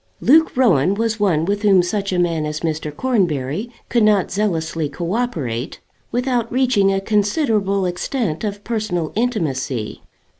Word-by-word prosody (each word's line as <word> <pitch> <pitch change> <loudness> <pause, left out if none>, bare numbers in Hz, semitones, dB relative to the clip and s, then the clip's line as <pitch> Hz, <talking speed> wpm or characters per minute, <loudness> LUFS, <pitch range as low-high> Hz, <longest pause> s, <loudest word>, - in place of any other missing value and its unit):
Luke 315 +1 +4
Rowan 190 - +3
was 225 0 -1
one 170 -6 +2
with 205 +2 -1
whom 195 -4 +5
such 195 +2 -2
a 180 - 0
man 170 -3 +1
as 150 0 -4
Mr. 155 -2 -2
Cornbury 175 - -1 0.2
could 235 - +1
not 210 -3 +3
zealously 165 -6 -1
co 170 +5 -4
operate 150 - -3 0.3
without 245 -2 -1
reaching 245 -6 +3
a 195 - +1
considerable 205 -1 +1
extent 180 - -2
of 205 -1 -4
personal 210 -8 -2
intimacy. 140 - -2
195 Hz, 145 wpm, -20 LUFS, 160-225 Hz, 0.3 s, whom